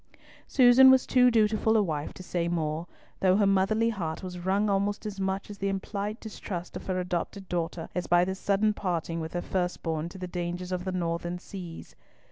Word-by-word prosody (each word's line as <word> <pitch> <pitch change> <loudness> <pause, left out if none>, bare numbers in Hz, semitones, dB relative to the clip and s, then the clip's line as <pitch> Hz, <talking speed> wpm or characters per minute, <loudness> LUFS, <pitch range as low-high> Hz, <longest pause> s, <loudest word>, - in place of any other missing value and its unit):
Susan 260 0 +7
was 260 -1 +6
too 250 -1 +5
dutiful 220 -1 +3
a 210 - +4
wife 155 -5 -3
to 185 - -11
say 175 -1 -1
more, 165 -1 -2 0.3
though 185 0 +4
her 205 - +4
motherly 200 +4 +3
heart 175 -6 -4
was 180 -1 -6
wrung 195 +4 +1
almost 200 +1 0
as 205 -2 -5
much 190 +1 -2
at 200 - -10
the 195 - 0
implied 200 +2 -3
distrust 190 -5 -6
of - - -7
her 185 -1 0
adopted 180 +2 -3
daughter 170 -1 -3
as 180 - -2
by 175 0 +4
the 190 - -2
sudden 200 +2 +1
parting 170 -4 -2
with 160 0 -5
her 175 - -2
first 180 -1 -2
born 160 0 -2
to 180 - -11
the 185 - -5
dangers 175 +1 -4
of 180 0 -2
the 185 - -1
northern 175 -1 -2
seas. 180 -2 -9
185 Hz, 205 wpm, -28 LUFS, 175-205 Hz, 0.3 s, Susan